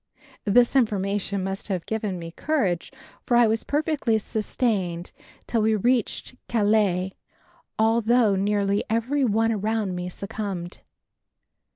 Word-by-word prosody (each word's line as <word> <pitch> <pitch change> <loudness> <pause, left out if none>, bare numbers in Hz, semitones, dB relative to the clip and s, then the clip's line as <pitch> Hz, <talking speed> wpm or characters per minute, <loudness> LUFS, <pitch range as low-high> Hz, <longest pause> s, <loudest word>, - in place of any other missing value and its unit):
This 240 +5 +4
information 200 -4 +1
must 195 +1 -4
have 185 -5 -2
given 210 -4 -2
me 165 -1 -7
courage, 195 - -1 0.3
for 240 - +2
I 240 - +6
was 225 0 +1
perfectly 290 -6 +1
sustained 205 -5 -2 0.3
till 230 - 0
we 220 +1 +3
reached 240 +3 0
Calais, 205 -4 +2 0.7
although 225 -1 +3
nearly 200 +1 +1
every 245 +6 +1
one 225 -1 +2
around 215 -2 -1
me 180 0 -4
succumbed. 195 -2 -5
215 Hz, 115 wpm, -25 LUFS, 195-230 Hz, 0.7 s, I